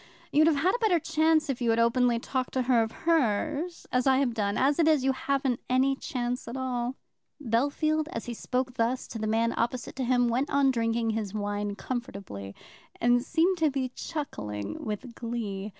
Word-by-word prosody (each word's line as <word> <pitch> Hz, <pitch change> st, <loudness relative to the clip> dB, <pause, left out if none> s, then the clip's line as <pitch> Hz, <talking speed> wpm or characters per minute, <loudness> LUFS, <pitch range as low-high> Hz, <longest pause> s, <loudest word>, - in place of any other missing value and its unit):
You'd 310 Hz, +2 st, +5 dB
have 325 Hz, -, +4 dB
had 330 Hz, +7 st, +2 dB
a 485 Hz, -, -1 dB
better 430 Hz, -7 st, +3 dB
chance 315 Hz, 0 st, +2 dB
if 265 Hz, -3 st, -3 dB
you 235 Hz, -, +1 dB
had 225 Hz, -, +3 dB
openly 235 Hz, +1 st, +3 dB
talked 255 Hz, +2 st, -3 dB
to 260 Hz, -, +2 dB
her 245 Hz, -2 st, +4 dB
of 220 Hz, 0 st, -1 dB
hers, 310 Hz, -, +1 dB
as 250 Hz, +1 st, +1 dB
I 265 Hz, -1 st, +5 dB
have 265 Hz, -3 st, +1 dB
done. 205 Hz, -2 st, -1 dB
As 285 Hz, +4 st, +2 dB
it 325 Hz, -, +4 dB
is, 305 Hz, -4 st, +4 dB
you 270 Hz, -, +3 dB
haven't 265 Hz, -2 st, -1 dB
any 260 Hz, +2 st, +3 dB
chance 250 Hz, -4 st, -3 dB
at 235 Hz, +3 st, -5 dB
all." 250 Hz, -1 st, -2 dB, 0.4 s
Bellfield, 295 Hz, +5 st, +1 dB
as 230 Hz, -, -5 dB
he 240 Hz, -, -4 dB
thus -, -, -10 dB
spoke 250 Hz, 0 st, -1 dB
to 235 Hz, 0 st, -1 dB
the 215 Hz, -, -2 dB
man 230 Hz, +2 st, +1 dB
opposite 240 Hz, +1 st, -2 dB
to 265 Hz, -, -1 dB
him, 245 Hz, 0 st, +3 dB
went 250 Hz, +5 st, 0 dB
on 275 Hz, -1 st, +3 dB
drinking 230 Hz, -1 st, 0 dB
his 215 Hz, -2 st, -3 dB
wine 205 Hz, 0 st, -2 dB
comfortably, 195 Hz, -, -6 dB, 0.4 s
and 245 Hz, +1 st, +4 dB
seemed 340 Hz, +7 st, +1 dB
to 315 Hz, -1 st, +4 dB
be 265 Hz, -2 st, -2 dB
chuckling 105 Hz, -, -5 dB
with 215 Hz, +3 st, -5 dB
glee. 220 Hz, -4 st, -4 dB
250 Hz, 200 wpm, -28 LUFS, 230-280 Hz, 0.4 s, You'd